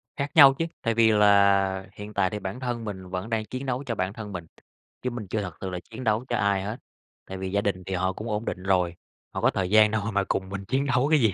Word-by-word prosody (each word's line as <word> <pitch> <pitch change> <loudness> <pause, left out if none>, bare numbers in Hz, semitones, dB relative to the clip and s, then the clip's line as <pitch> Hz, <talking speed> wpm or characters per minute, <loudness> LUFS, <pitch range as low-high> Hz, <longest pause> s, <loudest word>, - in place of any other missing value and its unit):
Khác 140 +1 -3
nhau 140 -4 +9
chứ, 165 +5 -2 0.2
tại 115 -2 0
vì 115 0 +5
là 100 -2 +4
hiện 105 +1 -8
tại 100 -2 +2
thì 105 - -4
bản 95 +5 -5
thân 120 -3 -3
mình 95 -3 -6
vẫn 90 +4 -4
đang 110 -2 -1
chiến 130 +5 -6
đấu 130 +1 -2
cho 120 -3 -2
bản 95 -1 -2
thân 105 -2 -7
mình, 90 -2 -5 0.6
chứ 125 - -1
mình 120 -4 -6
chưa 105 +3 -1
thật 90 -4 -5
sự 95 - -3
là 90 -1 -4
chiến 115 +3 -8
đấu 110 +1 +1
cho - - +1
ai 100 -1 +1
hết, 105 +4 -4 0.5
tại 95 - -5
vì 95 0 -4
gia 100 +1 +1
đình 95 -3 -2
thì 95 +2 -5
họ 95 +1 0
cũng 110 +4 -6
ổn 105 +1 -2
định 90 - -4
rồi, 90 -3 +1 0.4
họ - - -3
có - - +4
thời 95 -2 -1
gian 105 +1 +6
đâu 110 0 0
mà 100 0 +2
cùng 95 -1 -2
mình 100 0 -5
chiến 130 +6 0
đấu 130 0 +2
cái 155 -1 +5
gì. 110 -6 +3
105 Hz, 280 wpm, -26 LUFS, 95-115 Hz, 0.6 s, nhau